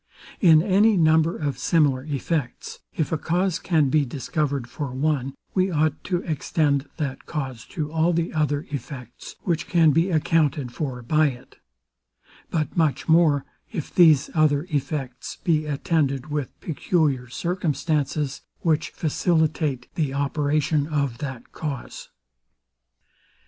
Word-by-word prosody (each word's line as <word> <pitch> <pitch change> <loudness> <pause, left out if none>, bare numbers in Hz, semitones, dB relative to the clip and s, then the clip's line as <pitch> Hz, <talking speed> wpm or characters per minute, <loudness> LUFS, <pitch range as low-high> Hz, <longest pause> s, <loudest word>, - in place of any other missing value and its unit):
In 160 -4 +6
any 205 +2 +4
number 160 0 +3
of 140 -5 -3
similar 140 -3 +2
effects, 145 -2 -3 0.2
if 155 - 0
a 160 - 0
cause 180 +2 0
can 155 -6 +2
be 150 +2 +3
discovered 140 0 -2
for 140 +2 -5
one, 135 -1 -1 0.2
we 185 0 +2
ought 155 -3 0
to 180 -1 -1
extend 145 -2 0
that 140 -4 -4
cause 130 -7 -4
to 150 -2 -4
all 160 +2 +2
the 170 0 -1
other 150 -2 0
effects, 125 -3 -7
which 170 -3 -1
can 165 -3 +4
be 165 +6 +2
accounted 155 -5 +1
for 130 -4 -4
by 155 +5 +3
it: 125 -3 -8 0.9
But 155 -2 -2
much 155 -6 +1
more, 160 -4 +4 0.3
if 170 -10 -5
these 155 -6 +5
other 150 -2 +3
effects 135 -3 -3
be 155 -3 +1
attended 145 -2 0
with 145 -3 -3
peculiar 145 -5 0
circumstances, 150 -3 -1 0.2
which 160 0 +1
facilitate 155 -4 0
the 145 -4 -1
operation 145 +1 +1
of 140 -6 -1
that 130 -5 -6
cause. 145 -5 -6
150 Hz, 130 wpm, -24 LUFS, 140-160 Hz, 0.9 s, In